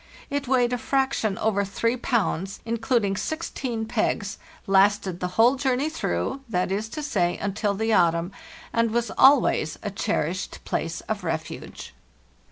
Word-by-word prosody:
It 285 Hz, -1 st, -2 dB
weighed 250 Hz, -1 st, +2 dB
a 245 Hz, -, -1 dB
fraction 260 Hz, -6 st, 0 dB
over 210 Hz, -2 st, +1 dB
3 230 Hz, +4 st, 0 dB
pounds, 205 Hz, -6 st, -1 dB
including 230 Hz, -3 st, +1 dB
16 255 Hz, -, -3 dB
pegs, 220 Hz, -3 st, -1 dB, 0.3 s
lasted 195 Hz, -2 st, +3 dB
the 180 Hz, -, -1 dB
whole 240 Hz, +4 st, +5 dB
journey 265 Hz, +2 st, +1 dB
through—that 190 Hz, -, -2 dB
is 210 Hz, +3 st, -2 dB
to 305 Hz, +5 st, -5 dB
say, 175 Hz, -11 st, 0 dB
until 200 Hz, +1 st, -1 dB
the 220 Hz, +2 st, 0 dB
autumn 170 Hz, -1 st, +3 dB, 0.4 s
and 230 Hz, 0 st, +2 dB
was 235 Hz, +1 st, -1 dB
always 265 Hz, -, +4 dB
a 205 Hz, -, -3 dB
cherished 190 Hz, -3 st, -2 dB
place 165 Hz, +1 st, -2 dB
of 210 Hz, -3 st, -4 dB
refuge. 160 Hz, -2 st, -5 dB
220 Hz, 140 wpm, -25 LUFS, 195-250 Hz, 0.4 s, whole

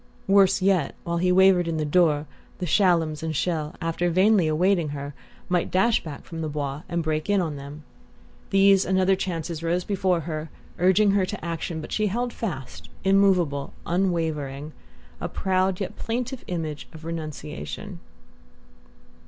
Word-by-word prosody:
Worse 195 Hz, -1 st, +4 dB
yet, 185 Hz, -7 st, +2 dB
while 170 Hz, 0 st, -2 dB
he 180 Hz, +1 st, +2 dB
wavered 185 Hz, -1 st, +5 dB
in 165 Hz, -1 st, -1 dB
the 155 Hz, -, -1 dB
doorway 150 Hz, -1 st, +3 dB, 0.3 s
the 180 Hz, -, -3 dB
Shallums 165 Hz, -4 st, +2 dB
and 160 Hz, -1 st, -3 dB
Chelles, 155 Hz, 0 st, -1 dB
after 165 Hz, +1 st, -1 dB
vainly 185 Hz, 0 st, +4 dB
awaiting 170 Hz, +1 st, +2 dB
her, 140 Hz, +1 st, -6 dB, 0.3 s
might 180 Hz, -1 st, 0 dB
dash 205 Hz, +5 st, +2 dB
back 150 Hz, -4 st, -8 dB
from 165 Hz, -2 st, -6 dB
the 155 Hz, -, -2 dB
Bois 145 Hz, -1 st, -3 dB
and 170 Hz, -1 st, -1 dB
break 155 Hz, +2 st, -2 dB
in 205 Hz, -1 st, +4 dB
on 160 Hz, -5 st, -2 dB
them. 140 Hz, +2 st, -9 dB, 0.7 s
These 195 Hz, 0 st, +5 dB
and 190 Hz, 0 st, +1 dB
other 190 Hz, +1 st, +4 dB
chances 170 Hz, -3 st, -4 dB
rose 170 Hz, +2 st, 0 dB
before 185 Hz, -3 st, 0 dB
her, 155 Hz, 0 st, -5 dB, 0.3 s
urging 190 Hz, +3 st, +4 dB
her 195 Hz, -2 st, +2 dB
to -, -, -6 dB
action; 165 Hz, -1 st, -3 dB
but 155 Hz, -, -9 dB
she 215 Hz, -1 st, +1 dB
held 240 Hz, +4 st, -2 dB
fast, 130 Hz, -, -6 dB
immovable, 185 Hz, -8 st, +2 dB
unwavering, 160 Hz, -5 st, -1 dB, 0.5 s
a -, -, -3 dB
proud 185 Hz, -1 st, 0 dB
yet 195 Hz, -, -4 dB
plaintive 245 Hz, +2 st, -3 dB
image 160 Hz, -4 st, -4 dB
of 160 Hz, 0 st, -11 dB
renunciation. 165 Hz, +4 st, -6 dB
170 Hz, 160 wpm, -25 LUFS, 155-190 Hz, 0.7 s, wavered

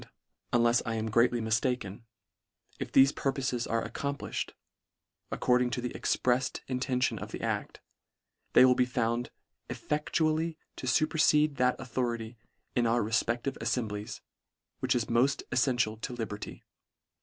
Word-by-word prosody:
un 120 Hz, -1 st, +3 dB
lefs 120 Hz, 0 st, +4 dB
I 115 Hz, -, -2 dB
am 110 Hz, 0 st, -2 dB
greatly 120 Hz, +2 st, +3 dB
miftaken, 110 Hz, -1 st, -1 dB, 0.8 s
if -, -, -4 dB
thefe 135 Hz, +1 st, +6 dB
purpof 135 Hz, -2 st, -1 dB
es 120 Hz, -1 st, -2 dB
are 115 Hz, 0 st, -1 dB
accomplifhed, 140 Hz, +5 st, -3 dB, 0.8 s
according 125 Hz, 0 st, +2 dB
to 125 Hz, -, -2 dB
the 125 Hz, 0 st, -4 dB
ex -, -, 0 dB
preft 125 Hz, +1 st, 0 dB
intention 125 Hz, 0 st, 0 dB
of -, -, -7 dB
the -, -, -6 dB
act, -, -, -3 dB, 0.7 s
they -, -, +8 dB
will 130 Hz, -, +6 dB
be 125 Hz, 0 st, +2 dB
found 120 Hz, -1 st, -1 dB, 0.4 s
effectually 155 Hz, +2 st, -1 dB, 0.2 s
to 130 Hz, -, -5 dB
fuperfede 150 Hz, 0 st, +3 dB
that 125 Hz, 0 st, +2 dB
authority 120 Hz, -2 st, -3 dB, 0.4 s
in 120 Hz, -1 st, +3 dB
our 120 Hz, 0 st, +2 dB
refpective 120 Hz, +4 st, -1 dB
alfemblies, 105 Hz, -4 st, -3 dB, 0.6 s
which -, -, +1 dB
is 120 Hz, -2 st, +1 dB
moft 125 Hz, +4 st, +2 dB
elfential 120 Hz, -3 st, +1 dB
to 125 Hz, -, -4 dB
liberty. 110 Hz, -3 st, -6 dB
125 Hz, 140 wpm, -30 LUFS, 115-130 Hz, 0.8 s, they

